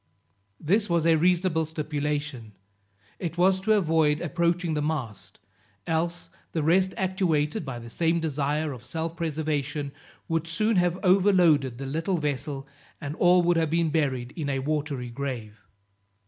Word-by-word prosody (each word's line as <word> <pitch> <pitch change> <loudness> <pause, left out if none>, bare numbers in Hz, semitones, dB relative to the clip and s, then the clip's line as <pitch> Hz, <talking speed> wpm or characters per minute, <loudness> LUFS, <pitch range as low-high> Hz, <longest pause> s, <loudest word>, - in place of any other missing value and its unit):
This 200 +6 +1
was 170 -2 +2
a 165 - +5
reasonable 175 0 +2
stipulation; 150 -6 -3 0.7
it 170 -1 -4
was 190 +1 +3
to 215 +3 +3
avoid 160 -6 +2
approaching 170 0 0
the 150 - 0
mast, 145 -9 -4 0.5
else, 170 +1 -2 0.2
the 160 - 0
rest 185 +4 +3
actuated 175 -6 0
by 135 -4 -5
the 120 0 -9
same 165 +7 +1
desire 150 0 -1
of 120 -2 -11
self 165 +4 -4
preservation, 150 -3 -2 0.4
would 165 0 -1
soon 215 +6 +1
have 175 0 +2
overloaded 180 -9 +4
the 135 - -5
little 160 +7 -1
vessel, 145 -2 -3 0.3
and 145 +1 -5
all 180 0 +5
would 175 0 +3
have 160 -2 +1
been 165 0 +1
buried 130 -5 -1
in 150 -4 -3
a 135 - 0
watery 140 -3 -2
grave. 120 -5 -5
160 Hz, 145 wpm, -26 LUFS, 145-175 Hz, 0.7 s, a